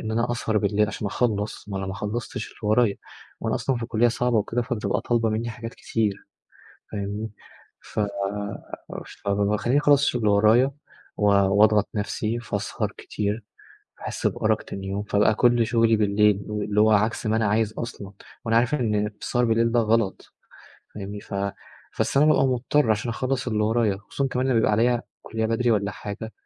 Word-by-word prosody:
إن 110 - -4
أنا 115 +2 0
أسهر 110 -2 0
بالليل 105 +1 +2
علشان 105 -1 -4
أخلّص، 105 -1 -2
ما 95 -1 -3
أنا 95 - -3
ماخلّصتش 105 +4 -4
اللي - - -18
ورايا، 105 0 +3 0.4
ما - - -2
أنا - - +1
أصلًا 135 -2 0
في 115 -1 -4
كُلّية 120 0 +3
صعبة 120 0 0
وكده 115 +4 -1
فتبقى 120 -2 -1
طالبة 115 -2 +1
منّي 115 +2 -2
حاجات 115 0 -8
كتير 105 -3 -2 0.7
فاهمني، 105 +1 -4 0.5
ف - - -6 1.3
فب 100 0 +1
باخلّيني 105 +7 +2
أخلّص 145 -1 +4
الشغل 125 -4 +1
اللي 105 -1 +3
ورايا 115 +6 +4 0.5
و 105 - +1
وأضغط 100 +1 +4
نَفْسي 110 +2 -2
فأسهر 120 - -3
كتير 105 +1 -3 0.5
باحس - - -2
بأرق - - 0
تاني 95 0 -7
يوم 100 +1 -2
فابقى 105 +1 +2
كل 120 -1 +3
شغلي 115 -1 +3
بالليل، 105 0 +3
اللي 105 0 0
هو 110 - +5
عكس 110 +3 +2
ما 110 - +2
أنا 110 - +1
عايز 110 +1 +1
أصلًا 105 -5 -7 0.3
وأنا 115 0 +3
عارف 125 +5 +2
إن 105 -6 0
السهر 125 0 +1
بالليل 115 0 +2
ده 120 - +3
غلط 110 -2 0 0.6
فاهمني، 100 0 -6
ف - - -11 0.7
بس - - +1
أنا 145 - +6
بابقى 155 -3 +4
مضطر 130 +1 +1
علشان 110 +2 +1
أخلّص 130 +2 -2
اللي 105 -3 +1
ورايا 110 -2 +1
خصوصًا 135 +7 -3
كمان 130 0 -1
لمّا 130 -3 +2
بيبقى 110 -1 +3
عليَّ 120 +3 +2 0.2
كُلّية 110 0 -2
بدري 115 +1 +1
والّا 100 -1 +1
حاجة، 105 +2 -7
110 Hz, 175 wpm, -24 LUFS, 105-120 Hz, 1.3 s, أنا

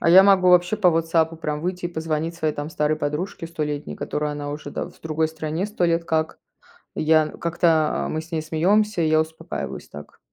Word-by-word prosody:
А - - +2
я 185 +3 +9
могу 190 -2 +5
вообще 180 +3 +4
по 195 -4 +4
"Вотсапу" 165 0 +1
прям 150 -2 -3
выйти 180 +1 -2
и - - -5
позвонить 160 0 -2
своей, 155 -3 -1
там, 145 +2 -5
старой 150 0 0
подружке 155 +3 -3
столетней, 150 -3 -4
которую 150 0 -2
она 145 0 -5
уже, 150 +1 -6
да, - - -3
в - - -19
другой 160 0 0
стране 160 +3 -3
100 210 -4 -1
лет 170 0 +1
как. 160 -1 -1 0.6
Я 155 0 +3
как-то 165 -2 +1
мы 155 - -2
с 165 +2 -13
ней 160 - -1
смеемся, 185 +5 +2
и 160 - +2
я 155 0 +4
успокаиваюсь 160 0 -5
так. 75 0 -12
160 Hz, 205 wpm, -23 LUFS, 155-175 Hz, 0.6 s, я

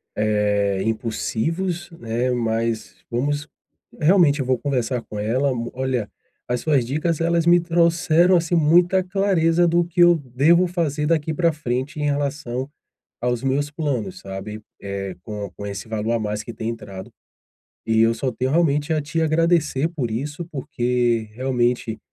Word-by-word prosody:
eh, 105 -2 +1
impulsivos, 160 - -2
né. 120 +2 -1
Mas 115 -1 -1
vamos 145 +5 -1 0.5
realmente 160 -3 +4
eu 135 - -1
vou 130 0 +2
conversar 125 -3 -1
com 105 - -8
ela, 125 +7 +1 0.2
olha, 130 -4 -2 0.4
as 125 0 -1
suas 140 -6 +2
dicas 155 +5 -1
elas 170 0 +2
me 175 +1 +6
trouxeram, 170 +1 +3
assim, 170 +1 0
muita 175 +4 +4
clareza 180 -3 +2
do 170 +1 +3
que 175 +1 0
eu 175 0 +7
devo 150 +6 +3
fazer 155 -4 -1
daqui 160 -1 +1
pra 170 +2 +2
frente 145 +2 -3
em - - -1
relação 140 -3 -2 0.5
aos 120 0 -1
meus 140 +2 0
planos, 150 - -3
sabe, 100 +3 -7 0.2
eh, 100 -1 -4
com 105 -2 -6
com 100 - -6
esse 100 0 -6
valor 110 +1 -2
a 115 - +2
mais 105 -1 -3
que 115 - -8
tem 110 +1 -4
entrado, 100 -5 -8 0.8
e 110 0 +2
eu 115 +1 +4
só 125 +3 -2
tenho 130 +3 -1
realmente 150 -1 +2
a 155 - +1
te 150 +3 -2
agradecer 160 -2 +2
por 135 -9 -3
isso, 145 +9 -4
porque 120 -4 0
realmente 120 -2 0
135 Hz, 155 wpm, -22 LUFS, 115-165 Hz, 0.8 s, eu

